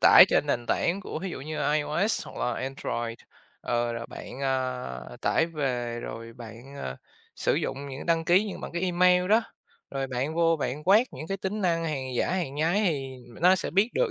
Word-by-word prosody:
tải -, -, +10 dB
trên -, -, +2 dB
nền 120 Hz, 0 st, -1 dB
tảng 180 Hz, +4 st, +1 dB
của 190 Hz, -, -5 dB
thí 190 Hz, -, -3 dB
dụ 130 Hz, -, -6 dB
như 155 Hz, +3 st, -5 dB
là 145 Hz, -, +1 dB
IOS 155 Hz, +8 st, +1 dB
hoặc -, -, -10 dB
là 125 Hz, -, 0 dB
Android, 120 Hz, -3 st, -3 dB, 0.4 s
ờ, 120 Hz, 0 st, 0 dB
rồi 115 Hz, 0 st, -5 dB
bạn, 130 Hz, -, -8 dB
ờ, 130 Hz, -, -2 dB
tải 165 Hz, -, +2 dB
về 125 Hz, -7 st, -2 dB
rồi 115 Hz, 0 st, -7 dB
bạn, 120 Hz, +3 st, -11 dB
ờ, 65 Hz, -, -5 dB, 0.4 s
sử -, -, +1 dB
dụng 140 Hz, +1 st, -2 dB
những 135 Hz, 0 st, -7 dB
đăng 165 Hz, -1 st, +2 dB
ký 180 Hz, +5 st, +5 dB
như 200 Hz, -, -5 dB
bằng -, -, -7 dB
cái 175 Hz, -, -2 dB
email 180 Hz, 0 st, +4 dB
đó, 220 Hz, +3 st, +5 dB, 0.5 s
rồi 135 Hz, -1 st, -2 dB
bạn 130 Hz, +4 st, -2 dB
vô 165 Hz, 0 st, +3 dB
bạn 145 Hz, 0 st, -3 dB
quét 210 Hz, +7 st, +6 dB
những 155 Hz, -, -7 dB
cái 195 Hz, -, -2 dB
tính 195 Hz, +3 st, -3 dB
năng 170 Hz, -3 st, +1 dB
hàng 145 Hz, -5 st, -2 dB
giả -, -, +1 dB
hàng 175 Hz, -7 st, -1 dB
nhái 165 Hz, +7 st, +2 dB
thì 135 Hz, -5 st, -2 dB, 0.2 s
nó 180 Hz, +2 st, +7 dB
sẽ -, -, -3 dB
biết 200 Hz, +7 st, +3 dB
được -, -, +2 dB
150 Hz, 215 wpm, -27 LUFS, 130-180 Hz, 0.5 s, tải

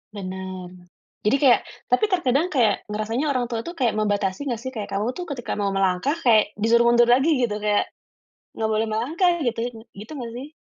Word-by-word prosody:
Benar. 185 Hz, -2 st, -6 dB, 0.5 s
Jadi 215 Hz, +6 st, +4 dB
kayak 255 Hz, -3 st, +6 dB, 0.3 s
tapi 250 Hz, +12 st, +4 dB
terkadang 330 Hz, -, +1 dB
kayak, 240 Hz, -, +1 dB
ngerasanya 215 Hz, +7 st, -2 dB
orang 255 Hz, -3 st, 0 dB
tua 230 Hz, -, -1 dB
tuh, 340 Hz, -, -6 dB
kayak 250 Hz, -7 st, +1 dB
membatasi 205 Hz, +4 st, -1 dB
gak 235 Hz, -3 st, -2 dB
sih? 260 Hz, -, -4 dB
Kayak 215 Hz, -5 st, -6 dB
kamu 215 Hz, +5 st, 0 dB
tuh 360 Hz, -, -4 dB
ketika 240 Hz, -, -4 dB
mau 200 Hz, -1 st, 0 dB
melangkah, 195 Hz, -, +1 dB
kayak 215 Hz, -3 st, +4 dB
disuruh 235 Hz, +3 st, +3 dB
mundur 240 Hz, 0 st, +5 dB
lagi 265 Hz, +6 st, +4 dB
gitu, 220 Hz, -3 st, 0 dB
kayak, 210 Hz, 0 st, 0 dB, 0.7 s
gak 220 Hz, 0 st, 0 dB
boleh 220 Hz, +1 st, +1 dB
melangkah 330 Hz, -, +1 dB
gitu 235 Hz, -1 st, -1 dB
ya? 245 Hz, -, -2 dB, 0.2 s
Gitu 210 Hz, +6 st, -10 dB
gak 235 Hz, -3 st, -6 dB
sih? 260 Hz, +4 st, -7 dB
230 Hz, 190 wpm, -23 LUFS, 210-260 Hz, 0.7 s, kayak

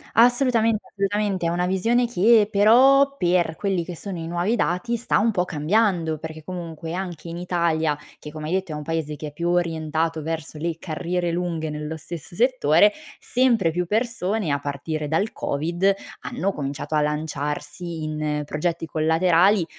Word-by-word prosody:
Assolutament 235 Hz, -2 st, +4 dB
assolutamente, 200 Hz, -2 st, -1 dB
è -, -, +2 dB
una 175 Hz, +1 st, 0 dB
visione 230 Hz, +7 st, +2 dB
che 220 Hz, 0 st, +4 dB
però, 265 Hz, +7 st, +5 dB
per 175 Hz, -4 st, +1 dB
quelli 190 Hz, -3 st, -1 dB
che 175 Hz, -, -6 dB
sono 190 Hz, +2 st, -6 dB
i 165 Hz, -1 st, -5 dB
nuovi 175 Hz, +6 st, 0 dB
dati 215 Hz, +3 st, 0 dB
sta 235 Hz, +1 st, +1 dB
un 225 Hz, +2 st, +3 dB
po' 180 Hz, -4 st, 0 dB
cambiando, 170 Hz, 0 st, +1 dB
perché 160 Hz, 0 st, -8 dB
comunque, 165 Hz, -2 st, -6 dB
anche 175 Hz, -3 st, -5 dB
in 165 Hz, -, -6 dB
Italia, 170 Hz, -4 st, 0 dB, 0.2 s
che 150 Hz, -, -9 dB
come 155 Hz, 0 st, -6 dB
hai 165 Hz, -, -2 dB
detto, 190 Hz, -2 st, -1 dB
è -, -, -3 dB
un 150 Hz, -, -5 dB
paese 155 Hz, -1 st, -2 dB
che 150 Hz, -, -6 dB
è 145 Hz, -, -9 dB
più 170 Hz, +3 st, -2 dB
orientato 160 Hz, -2 st, 0 dB
verso 160 Hz, -1 st, -5 dB
le 165 Hz, +1 st, -3 dB
carriere 175 Hz, +1 st, -2 dB
lunghe 170 Hz, -2 st, -2 dB
nello 150 Hz, +1 st, -5 dB
stesso 165 Hz, +1 st, -8 dB
settore, 210 Hz, -, +4 dB, 0.3 s
sempre 235 Hz, -9 st, +2 dB
più 180 Hz, +2 st, -1 dB
persone 215 Hz, -, -1 dB
a 145 Hz, -, +1 dB
partire 145 Hz, +2 st, -4 dB
dal 165 Hz, +9 st, 0 dB
COVID, 170 Hz, +7 st, 0 dB, 0.3 s
hanno 195 Hz, +1 st, -2 dB
cominciato 145 Hz, +2 st, -4 dB
a 150 Hz, -, +3 dB
lanciarsi 150 Hz, +2 st, -3 dB
in 150 Hz, -1 st, -2 dB
progetti 165 Hz, +3 st, -2 dB
collaterali, 165 Hz, +4 st, +3 dB
170 Hz, 165 wpm, -23 LUFS, 155-200 Hz, 0.3 s, però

